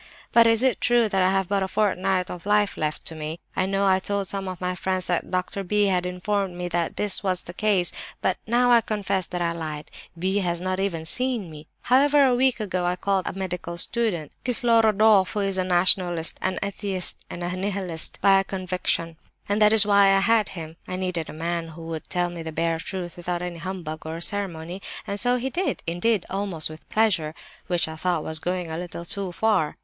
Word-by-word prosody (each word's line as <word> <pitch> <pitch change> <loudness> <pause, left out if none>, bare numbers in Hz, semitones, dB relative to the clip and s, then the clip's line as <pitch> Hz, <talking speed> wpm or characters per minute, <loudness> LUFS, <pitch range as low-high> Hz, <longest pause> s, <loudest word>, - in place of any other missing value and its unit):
"But 230 -1 +7
is 225 +1 +3
it 260 -2 +2
true 240 -2 +4
that 195 -2 +1
I 185 - +4
have 190 -1 +1
but 200 0 0
a 190 - 0
fortnight 190 -2 0
of 180 +2 -8
life 210 -1 +3
left 155 0 -3
to - - -2
me? 155 +1 -5 0.2
I 185 - +1
know 195 +1 +1
I 190 -1 +4
told 200 0 -1
some 195 0 -4
of 185 -1 -5
my 180 0 -1
friends 185 0 -2
that 175 - -1
Doctor 185 +2 -2
B. 205 +2 +2
had 180 -2 +1
informed 185 +1 -2
me 180 0 -3
that 170 -1 -1
this 205 -2 0
was 185 -3 -1
the 175 - -9
case; 195 -3 +1 0.3
but 190 0 0
I - - -13
now 240 0 +5
confess 200 -4 -2
that 175 -1 -3
I 170 - +1
lied; 155 -3 -6 0.3
B. 190 +4 0
has 175 -3 -1
not 185 +1 -2
even 170 -5 -2
seen 240 -2 -1
me. 155 0 -11
However, 280 +3 +4
a 255 - +4
week 255 0 +2
ago, 185 -4 -2
I 175 0 +1
called 195 0 0
in - - -3
a - - -8
medical 180 -2 -4
student, 175 - 0
Kislorodoff, 220 -5 +4
who 210 - -1
is 195 -1 -1
a - - +2
Nationalist, 175 -2 +2
an 185 0 -1
Atheist, 195 -2 0
and 175 - -6
a 175 +1 -2
Nihilist, 185 -4 -1
by 195 -1 +6
conviction, 185 -3 -2 0.3
and 205 +2 0
that 210 0 +7
is 220 -2 +6
why 200 -1 +5
I - - +4
had 220 0 +3
him. 165 -2 -8
I 185 - -4
needed 180 -3 -2
a - - -7
man 170 -1 -1
who 165 +1 -10
would 165 -1 -6
tell 175 -1 0
me 170 -1 -7
the 160 0 -5
bare 165 +1 0
truth 180 +1 -5
without 175 0 -3
any 175 -1 -5
humbug 165 -4 -6
or 160 +1 -4
ceremony—and 190 +1 -4
so 245 +2 +3
he 255 +2 -2
did—indeed, 220 - 0
almost 190 -6 -2
with 155 - -13
pleasure 180 -8 +1 0.3
(which 175 -2 +1
I 160 - -6
thought 175 0 -1
was 160 0 0
going 180 0 -2
a 160 - -3
little 175 -1 -6
too 195 +1 -2
far). 190 -5 +1
185 Hz, 215 wpm, -24 LUFS, 170-205 Hz, 0.3 s, But